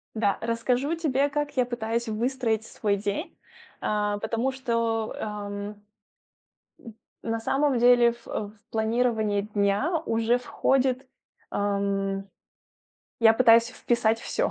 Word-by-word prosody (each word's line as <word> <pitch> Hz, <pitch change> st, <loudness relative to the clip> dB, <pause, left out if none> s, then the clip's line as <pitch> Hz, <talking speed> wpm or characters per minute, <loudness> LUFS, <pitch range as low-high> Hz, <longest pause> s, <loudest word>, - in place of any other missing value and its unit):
Да. 205 Hz, -3 st, +1 dB
Расскажу 245 Hz, +6 st, 0 dB
тебе 285 Hz, -4 st, +1 dB
как 295 Hz, 0 st, -2 dB
я 255 Hz, -, +3 dB
пытаюсь 235 Hz, -1 st, -2 dB
выстроить 225 Hz, 0 st, -1 dB
свой 205 Hz, -3 st, -1 dB
день, 205 Hz, -, -4 dB, 0.4 s
а, 210 Hz, -1 st, 0 dB
потому 230 Hz, +4 st, -1 dB
что, 230 Hz, -4 st, -1 dB
ам, 210 Hz, -1 st, -5 dB, 0.2 s
м, 210 Hz, 0 st, -13 dB, 1.4 s
на 225 Hz, 0 st, -2 dB
самом 275 Hz, +3 st, +1 dB
деле, 240 Hz, 0 st, +6 dB
в, 235 Hz, -, -16 dB
э, -, -, -2 dB
в 210 Hz, -, -16 dB, 0.2 s
планирование 220 Hz, -2 st, +1 dB
дня 205 Hz, -, 0 dB
уже 230 Hz, +2 st, +2 dB
входит, 260 Hz, +1 st, 0 dB, 0.4 s
ам 200 Hz, -1 st, -1 dB, 0.9 s
я 225 Hz, -1 st, +7 dB
пытаюсь 230 Hz, -1 st, +6 dB
вписать 235 Hz, -2 st, +1 dB
всё. -, -, -1 dB
230 Hz, 120 wpm, -26 LUFS, 210-250 Hz, 1.4 s, я